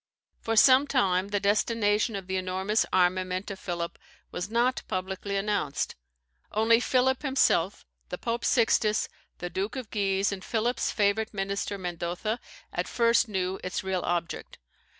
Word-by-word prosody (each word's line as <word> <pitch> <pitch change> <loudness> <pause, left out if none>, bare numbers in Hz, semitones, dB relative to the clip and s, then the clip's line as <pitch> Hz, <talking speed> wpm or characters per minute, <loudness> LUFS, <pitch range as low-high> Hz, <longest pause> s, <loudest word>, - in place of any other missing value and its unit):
For 225 - -2
some 260 +5 +7
time 195 -9 +2
the 205 0 0
destination 210 +1 +1
of 195 -2 -5
the 190 +1 -3
enormous 190 +3 0
armament 185 +1 +1
of 195 - -7
Philip 170 -2 -4 0.3
was 180 - -4
not 240 +3 +1
publicly 190 +2 -3
announced. 195 -8 -1 0.6
Only 225 +2 +4
Philip 255 +1 +2
himself, 265 - +2 0.2
the 180 - -4
Pope 235 +3 -3
Sixtus, 220 -3 +3 0.3
the 175 0 -5
Duke 195 +7 -2
of 255 -5 -6
Guise, 195 -1 +1
and 190 -2 -5
Philip's 235 +2 0
favourite 210 +1 0
minister, 200 +1 -2
Mendoza, 180 +5 -3 0.3
at - - -2
first 235 0 +3
knew 190 -1 -2
its 185 - -3
real 190 -1 -1
object. 175 -1 -3
200 Hz, 145 wpm, -28 LUFS, 185-225 Hz, 0.6 s, some